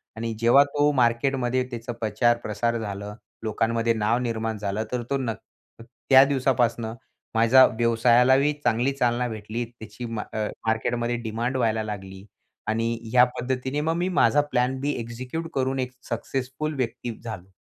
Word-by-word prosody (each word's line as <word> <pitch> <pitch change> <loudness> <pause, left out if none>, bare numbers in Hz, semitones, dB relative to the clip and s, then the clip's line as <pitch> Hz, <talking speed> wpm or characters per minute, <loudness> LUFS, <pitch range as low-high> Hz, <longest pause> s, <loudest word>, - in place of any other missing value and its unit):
आणि 115 0 -3
जेव्हा 120 +5 +6
तो 145 +1 +1
मार्केटमध्ये 130 0 +1
त्याचा 120 +1 -5
प्रचार 115 +2 +2
प्रसार 115 +3 -1
झालं, 105 -1 -5 0.3
लोकांमध्ये 115 +1 +1
नाव 110 +1 +1
निर्माण 115 -2 -2
झालं, 105 +1 -2
तर 125 -1 -2
तो 140 - +1
न 125 -4 -2 0.5
त्या 130 +3 +4
दिवसापासून 125 -4 +1 0.5
माझ्या 115 +4 +7
व्यवसायालाही 120 +5 +3
चांगली 125 +2 +2
चालना 125 -2 +1
भेटली. 110 +1 -4
त्याची, 115 0 -10
म 115 -2 -4
अ, 110 -1 -1 0.2
मार्केटमध्ये 120 +2 0
डिमांड 115 +4 -2
व्हायला 110 -3 +1
लागली 95 -2 -7 0.4
आणि 115 +1 0 0.2
या 125 0 +7 0.2
पद्धतीने 130 +3 -2
मग 160 +2 0
मी 180 +2 0
माझा 150 -5 +4
प्लॅन 125 +1 +1
बी 145 +2 -1
एक्झिक्यूट 125 +8 -5
करून 135 0 0
एक 125 -1 -2 0.2
सक्सेसफुल 135 +5 -3
व्यक्ती 120 -3 -4
झालो. 95 -5 -8
120 Hz, 145 wpm, -25 LUFS, 110-130 Hz, 0.5 s, माझ्या